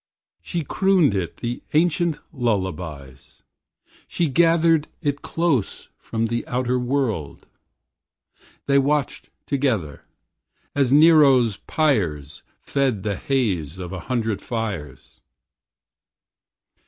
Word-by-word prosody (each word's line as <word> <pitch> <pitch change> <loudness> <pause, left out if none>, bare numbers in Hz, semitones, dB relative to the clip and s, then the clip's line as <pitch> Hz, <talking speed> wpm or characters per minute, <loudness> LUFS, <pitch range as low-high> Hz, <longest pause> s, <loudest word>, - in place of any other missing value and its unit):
She 170 -3 -3
crooned 185 - +2
it 90 -6 -3
the 120 +1 -4
ancient 170 0 +2 0.2
lullabies, 90 - -4 0.6
She 170 -3 -1
gathered 165 +1 +3 0.2
it 145 -1 -1
close 165 - -1
from 115 0 -3
the 120 +1 -2
outer 125 0 0
world. 125 - -2 1.2
They 140 0 +4
watched 145 +1 -1 0.2
together, 115 - -1 0.7
as 135 -3 +1
Nero's 140 -7 +5
pyres 90 - -1 0.2
Fed 130 -8 -1
the 105 -2 -1
haze 95 - -1
of 90 0 -7
a 95 - -5
hundred 110 -5 -1
fires. 100 - -6
125 Hz, 95 wpm, -22 LUFS, 95-145 Hz, 1.2 s, Nero's